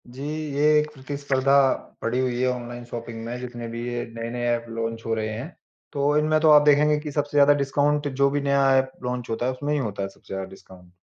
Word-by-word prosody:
जी, 125 +2 -11 0.3
ये 140 - -1 0.2
एक 150 0 -1
प्रतिस्पर्धा 140 -1 0 0.5
पड़ी 120 +2 -1
हुई 125 -2 -1
है 130 - +2
ऑनलाइन 120 -1 -5
शॉपिंग 115 -1 -7
में 120 +1 -4
जितने 120 -2 -6
भी 115 +1 -5
ये 120 0 -3
नए-नए 115 +1 -4
ऐप 120 0 -3
लॉन्च 115 0 -4
हो 115 - -1
रहे 110 -1 -2
हैं। 115 +6 -5 0.5
तो 145 +1 +1
इनमें 155 +1 +2
तो 160 - +5
आप 150 -1 +8
देखेंगे 150 +1 +5
कि 150 0 -6
सबसे 145 0 -2
ज़्यादा 145 0 +7
डिस्काउंट 145 +2 +1
जो 140 0 +2
भी 145 0 0
नया 140 -1 +3
ऐप 130 0 +1
लॉन्च 125 -1 -3
होता 115 +2 -2
है 130 - +1
उसमें 145 +3 -3
ही 150 - +1
होता 105 -6 -3
है 95 - -3
सबसे 95 - -13
ज़्यादा 95 0 -4
डिस्काउंट। 90 -2 -16
130 Hz, 230 wpm, -24 LUFS, 115-145 Hz, 0.5 s, आप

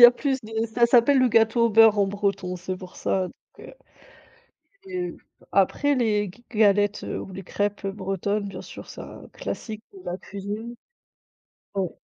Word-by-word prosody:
Il - - +7
y - - +14
a 240 - +12
plus 265 +1 -1
de 220 +1 -2
ça 235 +1 +3
s'appelle 245 +3 +5
le 255 -1 +5
gâteau 225 +1 +4
au 230 - 0
beurre 220 -1 +7
en 200 - +4
breton, 195 -2 -1
c'est 180 +1 -4
pour 185 -1 -11
ça, 185 -1 0
donc - - -20
heu, - - -12 1.1
c'est, 385 - -12 0.2
heu - - -15 0.3
après 285 0 +3
les 215 -4 +2
g 240 +6 -21
galettes 205 -2 +3
ou - - -5
les 190 +1 -7
crêpes, 205 +2 -2
heu, 195 - -1
bretonnes, 200 +1 -2
bien 190 -2 -7
sûr, - - -10
c'est - - -8
un - - -11
classique 215 -1 -6
de 390 - -12
la 180 - -3
cuisine. 210 +5 -6 1.0
Ouais. 190 -3 0
210 Hz, 190 wpm, -25 LUFS, 195-235 Hz, 1.1 s, y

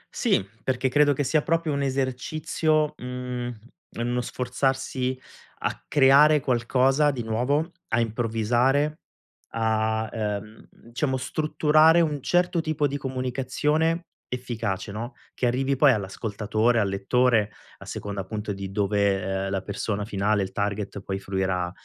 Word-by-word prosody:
Sì, 95 - +1 0.2
perché 130 0 0
credo 145 +2 +4
che 145 - -1
sia 150 +3 +2
proprio 165 0 0
un 140 - -1
esercizio, 140 +3 0
ehm, 125 -1 -4 0.5
uno 120 +1 -1
sforzarsi 130 +1 -1 0.4
a - - -3
creare 145 +2 +6
qualcosa 130 +3 +2
di 130 -4 -3
nuovo, 130 +9 0 0.2
a 115 - +1
improvvisare, 120 +6 +1 0.5
a, 110 0 0
ehm, 105 -1 -4
diciamo 130 +3 -3
strutturare 155 +4 +3
un 150 -4 0
certo 175 +2 +2
tipo 155 -2 0
di 140 0 -1
comunicazione 135 +5 -1 0.2
efficace, 115 -6 -3
no, 115 +5 -5 0.2
che 125 - 0
arrivi 135 +3 +1
poi 135 0 +5
all'ascoltatore, 110 +3 0
al 100 -3 +1
lettore, 110 +2 +2 0.3
a - - -11
seconda 100 -1 -5
appunto 105 +1 -4
di 95 0 -6
dove, 100 -1 +1
ehm, 95 +1 -2
la 95 -1 -2
persona 100 0 -3
finale, 105 0 +1
il 95 - -5
target, 100 0 -3
poi 95 0 -3
fruirà, 95 -2 -1
125 Hz, 130 wpm, -25 LUFS, 105-140 Hz, 0.5 s, creare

